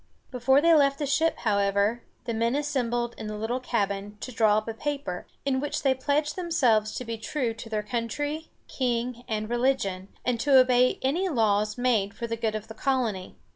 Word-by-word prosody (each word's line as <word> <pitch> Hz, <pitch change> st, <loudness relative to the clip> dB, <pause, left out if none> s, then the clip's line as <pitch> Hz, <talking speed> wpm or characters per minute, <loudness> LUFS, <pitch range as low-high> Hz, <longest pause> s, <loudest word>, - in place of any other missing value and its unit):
Before 265 Hz, +2 st, +3 dB
they 335 Hz, +1 st, +5 dB
left 280 Hz, -3 st, +4 dB
the 290 Hz, -, -2 dB
ship, 310 Hz, +3 st, +1 dB
however, 200 Hz, +1 st, +1 dB, 0.2 s
the 235 Hz, -, -2 dB
men 230 Hz, +3 st, +1 dB
assembled 240 Hz, -5 st, -1 dB
in 220 Hz, -, -5 dB
the 215 Hz, -, -4 dB
little 225 Hz, +4 st, -2 dB
cabin 205 Hz, -4 st, -2 dB
to 255 Hz, -, -5 dB
draw 220 Hz, -3 st, +3 dB
up 215 Hz, -, -2 dB
a 225 Hz, -, -3 dB
paper, 275 Hz, -8 st, -4 dB, 0.2 s
in 265 Hz, -2 st, +1 dB
which 290 Hz, +2 st, -3 dB
they 270 Hz, -2 st, +4 dB
pledged 285 Hz, +3 st, 0 dB
themselves 250 Hz, -, +1 dB
to 250 Hz, -, -4 dB
be 230 Hz, -1 st, -5 dB
true 235 Hz, +1 st, -2 dB
to 225 Hz, 0 st, -10 dB
their 215 Hz, -1 st, -2 dB
country, 290 Hz, +8 st, -3 dB, 0.2 s
king, 245 Hz, -1 st, -2 dB
and 215 Hz, -2 st, -2 dB
religion, 240 Hz, -6 st, 0 dB, 0.2 s
and 245 Hz, -2 st, 0 dB
to 275 Hz, +2 st, +5 dB
obey 255 Hz, 0 st, +4 dB
any 340 Hz, +9 st, +1 dB
laws 210 Hz, -, +1 dB
made 220 Hz, -5 st, +1 dB
for 235 Hz, -, -4 dB
the 230 Hz, 0 st, -2 dB
good 220 Hz, -1 st, -2 dB
of 215 Hz, 0 st, -5 dB
the 220 Hz, -, -8 dB
colony. 225 Hz, -6 st, -1 dB
240 Hz, 195 wpm, -27 LUFS, 215-270 Hz, 0.2 s, they